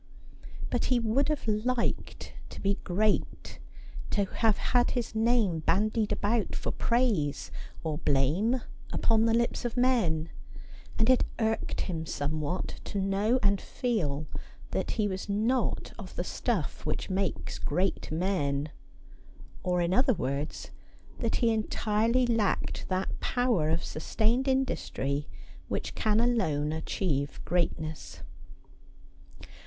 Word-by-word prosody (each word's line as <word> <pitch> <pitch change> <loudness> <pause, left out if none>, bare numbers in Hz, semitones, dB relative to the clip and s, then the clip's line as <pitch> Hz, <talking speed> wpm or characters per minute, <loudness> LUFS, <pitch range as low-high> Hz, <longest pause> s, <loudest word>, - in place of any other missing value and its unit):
But 245 - +1
he 250 -2 +3
would 235 +6 +1
have 300 -6 -1
liked 230 +3 -1 0.2
to - - -9
be 200 0 0
great, 205 +4 0 0.5
to 200 - +1
have 220 +1 +2
had 245 -1 +2
his 235 -2 -2
name 220 -6 +2
bandied 215 +6 +1
about 215 +1 0
for - - -2
praise 215 - +1 0.3
or 155 -2 -2
blame 175 - +2 0.3
upon 225 -1 +3
the 225 - +3
lips 235 0 +1
of 240 0 -3
men; 185 -11 +2 0.7
and 220 - +3
it 255 -1 +5
irked 220 -1 0
him 165 -3 -3
somewhat 150 +5 -2
to 200 - -3
know 195 +5 +2
and 200 -1 +3
feel 155 - -1 0.5
that - - -1
he 210 -2 +2
was 190 +1 -4
not 225 +5 0
of 190 -4 -9
the 175 - -1
stufE 190 - -2
which 155 +5 -2
makes 190 0 -2
great 180 +3 -1
men; 155 -4 0 0.9
or, 180 -1 +1
in 170 +1 +1
other 255 +3 +4
words, 140 +2 -3 0.5
that 230 -2 0
he 230 -1 +3
entirely 220 +3 +1
lacked 225 -4 0
that 185 0 -1
power 240 -11 +1
of 165 +1 +1
sustained 225 - +1
industry 150 - 0 0.4
which - - -3
can 215 0 +2
alone 160 -12 +1
achieve 155 -3 -2
greatness. 160 -2 -2
205 Hz, 125 wpm, -29 LUFS, 160-235 Hz, 0.9 s, it